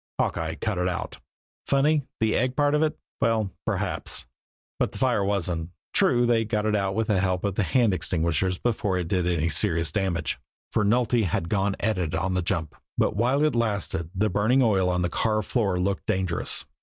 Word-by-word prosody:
Hawkeye 80 -2 -1
"cut 100 +2 -2
it 90 - +1
out." 90 -2 -4 0.5
Funny, 140 +1 +2
the 110 -1 +2
egg 125 +2 +1
part 145 -1 +2
of 150 - +3
it? 155 -1 +1 0.2
Well, 110 -4 +1 0.2
perhaps. - - -2 0.5
But - - 0
the - - -7
fire 125 -6 +2
wasn't. 90 -5 -1 0.2
True, 120 0 +4
they 115 -1 +3
got 105 -1 -1
it 105 0 +2
out 100 -1 0
with 110 0 +1
the 105 -3 +1
help 90 -1 0
of 100 -1 0
the 105 - 0
hand 115 0 +2
extinguishers 85 +1 0
before 105 -5 0
it 90 -2 -2
did 90 -1 0
any 85 -2 +1
serious 80 0 +1
damage, 85 -5 -1 0.3
for 105 - +1
Nulty 120 +2 +2
had 85 -1 -1
gone 100 -1 +1
at 110 -2 0
it 80 -3 -1
on 95 +3 -1
the 90 - +1
jump; 80 -3 -2 0.2
but - - +1
while 130 +7 +2
it 155 - +2
lasted 100 -7 -1
the 105 +2 +1
burning 110 +7 +3
oil 95 -5 +3
on 90 0 0
the - - +2
car 110 +5 0
floor 100 -4 0
looked 95 +1 -1
dangerous. 95 -4 0
100 Hz, 200 wpm, -26 LUFS, 90-115 Hz, 0.5 s, True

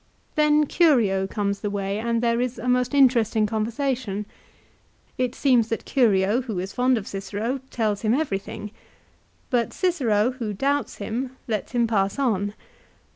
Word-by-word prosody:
Then 300 0 +4
Curio 230 - +3
comes 200 0 -2
the 205 - -3
way 200 0 -2
and 230 +1 -1
there 235 0 +2
is 250 0 -2
a 250 - -5
most 250 +2 +1
interesting 235 -5 +4
conversation. 220 -1 -2 0.9
It 255 -1 0
seems 245 -5 +3
that 225 - -3
Curio, 215 -2 +3
who 230 -6 -5
is 185 +2 -4
fond 250 0 +2
of 210 - -4
Cicero, 210 +6 -3
tells 215 -3 -1
him 220 +2 +2
everything. 210 -7 -3 0.8
But 240 -2 +1
Cicero, 250 - +1
who 235 -5 -4
doubts 280 +7 -1
him, 250 +5 -4
lets 215 0 -3
him 240 -1 +3
pass 200 -2 0
on. 210 -6 0
230 Hz, 150 wpm, -24 LUFS, 205-255 Hz, 0.9 s, Then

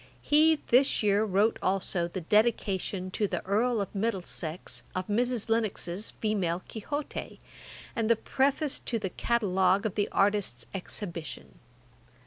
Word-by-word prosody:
] - - -30
He 310 +1 +6
this 255 -1 +4
year 205 0 +3
wrote 210 +2 +2
also 185 -2 0
the 180 +2 -5
Dedication[Dagger] 195 -2 +1
to 210 +2 0
the 180 -3 -4
Earl 225 +4 +2
of 195 - -5
Middlesex 185 -5 -3
of 185 0 -1
Mrs 240 +2 0
Lennox's 215 -4 -1
Female 185 -5 -1
Quixote, 285 +7 -5 0.6
and 225 -2 0
the 230 - +6
Preface 275 +5 0
to 235 - -2
the 195 -4 -3
Catalogue 190 -4 +2
of 215 - -1
the 205 - 0
Artists' 195 - +1
Exhibition. 180 -3 -5
205 Hz, 135 wpm, -29 LUFS, 185-230 Hz, 0.6 s, He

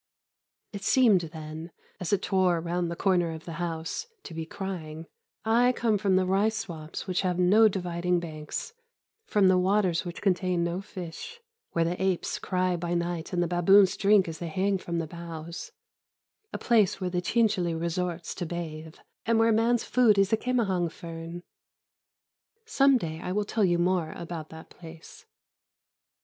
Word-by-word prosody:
It 200 - -6
seemed 215 -3 +4
then, 160 0 -7 0.3
as 180 - -3
it 200 -2 +1
tore 185 -3 +2
round 175 +1 -2
the 170 - -4
corner 175 -2 +1
of 160 0 -9
the 165 -1 -7
house, 165 - -3 0.2
to - - -9
be 160 0 -5
crying, 165 -5 -6 0.4
"I 240 +3 +4
come 225 -4 +1
from 195 -2 +2
the 185 0 +3
rice 205 +4 +1
swamps 165 -7 -6
which 185 -2 0
have 180 -2 -1
no 200 +5 +6
dividing 180 -2 -1
banks, 155 - -6 0.5
from 205 -2 +3
the 185 -1 +5
waters 185 -2 +2
which 175 -1 -7
contain 180 -3 +1
no 170 +2 -2
fish, 195 - -8 0.3
where 165 -1 +2
the 175 +2 -2
apes 190 -2 0
cry 185 -1 0
by 175 0 -2
night 170 -1 -2
and 175 -1 +1
the - - -1
baboons 185 +3 +5
drink 200 -2 +4
as 160 -1 -6
they 170 - -4
hang 190 +4 0
from 170 -1 -4
the 165 - -1
boughs; 170 - -8 0.8
a - - -4
place 215 -6 +2
where 185 -2 -2
the 180 0 0
chinchîli 180 -6 +1
resorts 170 0 -3
to 175 - -4
bathe, 160 -2 -6 0.3
and 230 0 +3
where 225 0 +4
man's 230 +2 +2
food 235 -5 +4
is 195 0 +3
the 220 - +4
kĕmahang 195 -9 0
fern." 165 +1 -8 1.2
Some 275 -11 +4
day 160 -7 -5
I 180 - -4
will 205 +2 0
tell 215 +1 0
you 175 -2 +3
more 175 -2 0
about 165 -2 -7
that 160 0 -12
place. 165 -1 -13
180 Hz, 170 wpm, -27 LUFS, 170-200 Hz, 1.2 s, no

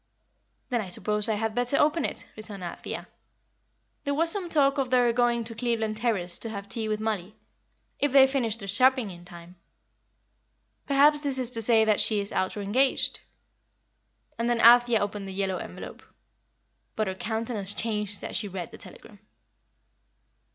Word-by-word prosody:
"Then 240 -3 0
I 200 - -6
suppose 210 +4 +1
I 220 - +1
had 220 +1 -2
better 245 +3 0
open 305 +1 +2
it," - - -5
returned 210 -3 -8
Althea. 175 - -6 1.0
"There 285 -1 -1
was 330 +2 +3
some 370 -3 -2
talk 280 -3 +3
of 265 -2 -1
their 245 -2 +3
going 240 -1 +1
to 230 0 -7
Cleveland 225 -2 -2
Terrace 205 -7 0
to 225 - 0
have 200 -2 -7
tea 220 +1 -3
with 215 0 -1
Mollie, 215 -3 -3 0.6
if 285 - +1
they 270 0 +7
finished 250 -5 -1
their 200 -4 -5
shopping 255 +1 +3
in 175 -1 -13
time. 175 0 -13 1.3
Perhaps 290 +1 +4
this 280 -3 0
is 255 -2 -1
to 230 -2 -1
say 225 0 +4
that 215 -1 +2
she 215 -2 +1
is 200 0 -4
out 190 +2 -1
or 205 - -4
engaged." 255 +7 0 1.2
And 235 +1 0
then 240 -1 +1
Althea 240 0 +6
opened 205 -1 -4
the 190 - -7
yellow 190 -1 -1
envelope. - - -9 0.9
But 215 - 0
her 190 - -3
countenance 215 0 -4
changed 210 -3 -3
as - - -6
she 210 - -2
read 185 -3 -6
the - - -12
telegram. 205 - -13
225 Hz, 170 wpm, -26 LUFS, 205-250 Hz, 1.3 s, they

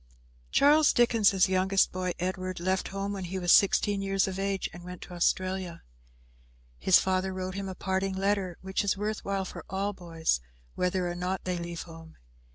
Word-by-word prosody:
Charles 295 +1 +5
Dickens' 220 -5 +4
youngest 190 +1 +2
boy, 185 -1 -2
Edward, 185 0 -3
left 185 +2 0
home 195 +1 -3
when 190 -2 -5
he 185 +2 -4
was 175 -1 +1
sixteen 200 0 +4
years 195 0 +1
of 190 0 -4
age 195 0 -1
and 175 - -10
went 180 0 -8
to 180 - -11
Australia. 185 0 -1 1.0
His 185 - +6
father 190 0 0
wrote 185 0 -4
him 195 0 -4
a 190 - -6
parting 190 +1 -1
letter, 195 -2 0
which 190 +1 -1
is 200 -1 0
worth 210 +1 -3
while 195 -1 -2
for - - -8
all 195 +2 -1
boys, 165 - -1 0.3
whether 180 0 0
or 175 - -2
no 180 +2 -2
they 180 -1 -2
leave 170 0 -5
home. 165 -1 -13
190 Hz, 180 wpm, -28 LUFS, 180-195 Hz, 1.0 s, His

